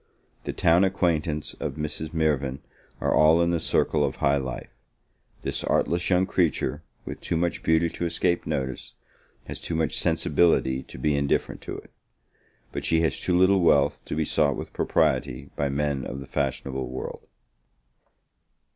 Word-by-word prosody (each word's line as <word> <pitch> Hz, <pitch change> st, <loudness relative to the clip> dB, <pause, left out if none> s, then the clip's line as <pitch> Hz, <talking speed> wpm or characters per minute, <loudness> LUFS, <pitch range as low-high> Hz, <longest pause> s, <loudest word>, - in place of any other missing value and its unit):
The -, -, -2 dB
town 85 Hz, +3 st, +3 dB
acquaintance 85 Hz, -5 st, 0 dB
of -, -, -3 dB
Mrs. 75 Hz, +1 st, -4 dB
Mirvan 70 Hz, -5 st, 0 dB, 0.4 s
are -, -, +1 dB
all 80 Hz, +2 st, +5 dB
in 85 Hz, 0 st, +2 dB
the 85 Hz, -, +1 dB
circle 75 Hz, -1 st, +1 dB
of 70 Hz, -, -1 dB
high 70 Hz, 0 st, +2 dB
life; 65 Hz, -3 st, -5 dB, 0.7 s
this -, -, -2 dB
artless 85 Hz, +3 st, +1 dB
young 90 Hz, 0 st, +3 dB
creature, 85 Hz, -5 st, 0 dB, 0.2 s
with -, -, -7 dB
too 85 Hz, -, -1 dB
much 85 Hz, +1 st, -1 dB
beauty 80 Hz, +1 st, +3 dB
to 85 Hz, -, -3 dB
escape 85 Hz, +1 st, 0 dB
notice, 65 Hz, -1 st, -3 dB, 0.5 s
has -, -, -6 dB
too 85 Hz, -, -2 dB
much 80 Hz, -4 st, 0 dB
sensibility 70 Hz, -5 st, +2 dB
to -, -, -12 dB
be 75 Hz, +3 st, +1 dB
indifferent 70 Hz, 0 st, 0 dB
to -, -, -6 dB
it; -, -, -13 dB, 0.8 s
but -, -, -4 dB
she 80 Hz, 0 st, +2 dB
has 80 Hz, -, 0 dB
too 90 Hz, -1 st, +1 dB
little 95 Hz, +1 st, +4 dB
wealth 75 Hz, -4 st, +3 dB
to -, -, -4 dB
be 80 Hz, 0 st, 0 dB
sought 75 Hz, -2 st, +2 dB
with -, -, -7 dB
propriety 65 Hz, +3 st, 0 dB
by 70 Hz, -1 st, 0 dB
men 70 Hz, -1 st, -1 dB
of 65 Hz, -, -5 dB
the 70 Hz, -, -8 dB
fashionable 65 Hz, -1 st, -2 dB
world. 65 Hz, +1 st, -7 dB
75 Hz, 165 wpm, -26 LUFS, 70-85 Hz, 0.8 s, all